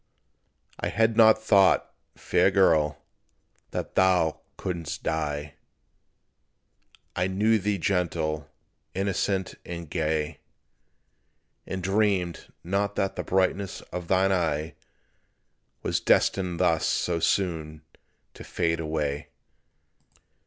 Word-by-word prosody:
I - - -1
had 110 0 +2
not 110 -1 +6
thought, 100 -3 +4 0.2
fair 90 +2 +2
girl, 80 -6 +3 0.7
that - - -5
thou 90 -4 +3 0.2
couldst 85 -2 -4
die; 75 -2 -2 1.6
I 90 +1 +1
knew 105 +4 +2
thee 105 +1 0
gentle, 80 -4 -1 0.5
innocent 95 0 -1
and 85 -1 -7
gay; 75 -2 -2 1.3
And 95 -1 -4
dreamed 95 -3 0
not 100 +3 -1
that 95 - -1
the - - -3
brightness 95 +1 0
of 90 -1 -5
thine 95 +1 +3
eye, 80 -4 0 1.1
Was - - 0
destined 90 -3 +2
thus 80 -1 +2
so 85 -1 0
soon 80 -4 -1 0.5
to - - -11
fade 85 -1 -1
away. 75 -3 -2
90 Hz, 100 wpm, -26 LUFS, 80-95 Hz, 1.6 s, not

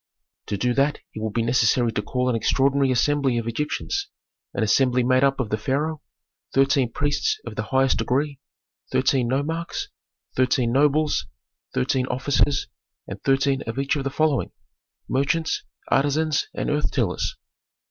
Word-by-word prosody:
"To 100 - -2
do 125 +4 +1
that 140 +3 +2 0.2
it 110 - -6
would 110 -1 -3
be 115 - +1
necessary 120 0 +2
to 105 - -1
call 125 +4 -1
an 125 - +1
extraordinary 135 +4 +2
assembly 135 0 +2
of 115 - -2
Egyptians, 150 - -2 0.4
an - - -1
assembly 125 +3 +3
made 130 +2 +3
up 135 0 +2
of 120 -5 -2
the 110 - 0
pharaoh, 150 +6 -1 0.5
thirteen 135 -2 +3
priests 145 - 0
of - - -7
the - - -1
highest 130 -3 +2
degree, 135 +4 0 0.5
thirteen 120 - +2
nomarchs, 165 - -2 0.5
thirteen 125 -2 +2
nobles, 150 +3 +2 0.5
thirteen 125 - +1
officers, 135 +2 +1 0.4
and - - -7
thirteen 135 0 +2
of 115 - -4
each 135 +2 +1
of 140 - -2
the 135 - -1
following: 150 -1 +1 0.6
merchants, 155 +5 0 0.3
artisans, 145 +2 +2
and - - -1
earth 150 0 +1
tillers." 110 -10 -1
135 Hz, 150 wpm, -24 LUFS, 125-145 Hz, 0.6 s, assembly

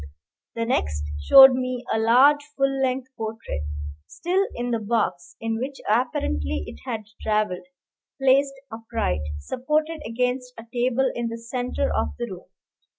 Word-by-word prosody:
The 230 0 -1
next 75 - 0 0.2
showed 265 - +9
me 255 -1 -2
a 220 - +1
large 260 +6 +5 0.2
full 275 0 +1
length 260 0 0
portrait, 220 - -5 0.5
still 375 +3 0
in 245 0 -2
the 230 - +1
box 205 -11 -1
in 225 0 -2
which 265 +2 -4
apparently 75 - 0
it 75 - -10
had 220 -1 -3 0.2
travelled, 210 -4 0 0.5
placed 275 +1 +3 0.2
upright, 225 - -2 0.2
supported 300 - -1
against 250 +1 -2
a 225 - -8
table 255 +2 +1
in 240 0 -2
the 230 0 -4
centre 245 - -2
of 75 -1 -1
the - - -2
room. - - -9
240 Hz, 145 wpm, -24 LUFS, 215-260 Hz, 0.5 s, showed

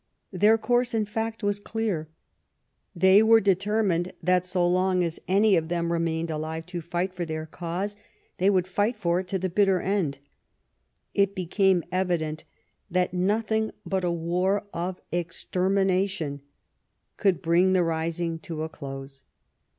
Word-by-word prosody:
Their 210 +5 +5
course, 240 +1 +1
in 215 -1 +1
fact, 225 +1 -4
was 205 0 0
clear. 205 -8 -3 0.9
They 190 +3 +6
were 225 +1 +6
determined 195 -2 +1
that 180 +1 +2
so 180 -1 +1
long 185 0 +2
as 165 -1 -3
any 200 +2 +4
of 160 -2 0
them 170 0 -1
remained 165 -1 -1
alive 160 +1 -4
to 175 - -2
fight 175 +3 -2
for 180 -1 -3
their 155 -1 -4
cause, 175 +5 -4 0.4
they 190 +2 +4
would 185 -3 +2
fight 205 +5 0
for 175 -4 0
it 185 - -5
to 190 - -1
the 185 0 -1
bitter 190 0 +3
end. 185 -7 -1 1.0
It 200 0 +2
became 185 0 +2
evident 170 -4 -1 0.4
that 180 0 0
nothing 220 +4 +1 0.2
but 190 -1 -1
a 175 - +1
war 180 +4 0
of 180 +2 -3
extermination 185 -2 0 0.7
could 195 -4 +2
bring 180 +2 +3
the 185 -1 +4
rising 165 0 -2
to 160 -1 -5
a 160 - -4
close. 135 -2 -8
180 Hz, 150 wpm, -26 LUFS, 170-200 Hz, 1.0 s, They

